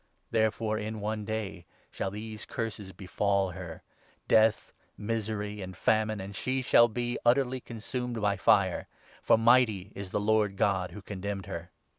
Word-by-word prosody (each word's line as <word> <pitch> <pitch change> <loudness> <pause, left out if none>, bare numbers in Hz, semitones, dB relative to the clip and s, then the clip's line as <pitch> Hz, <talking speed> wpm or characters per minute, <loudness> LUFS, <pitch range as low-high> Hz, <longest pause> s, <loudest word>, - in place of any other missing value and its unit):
Therefore 110 -1 +1
in 110 +1 -4
one 105 0 -3
day 105 -5 -4 0.2
shall - - -2
these 105 +2 -7
Curses 110 -4 -4
befall 100 0 0
8 - - -11
her 85 -3 -8 0.2
— - - -34
death, 110 0 +3 0.2
misery, 105 -1 -3
and 95 -1 -7
famine, 110 +1 +2
and 95 +1 -7
she 130 +5 -1
shall 120 -1 +6
be 120 +1 -2
utterly 130 +1 +3
con 120 -1 -9
sumed 125 +1 -4
by 105 -1 +2
fire; 95 -1 +3 0.3
for - - +5
mighty 115 -4 +4
is 100 -1 -7
the - - -1
Lord 105 -1 +2
God 95 -3 +1
who 100 +3 -10
condemned 100 0 -4
her. 85 +1 -6
105 Hz, 165 wpm, -29 LUFS, 100-110 Hz, 0.3 s, shall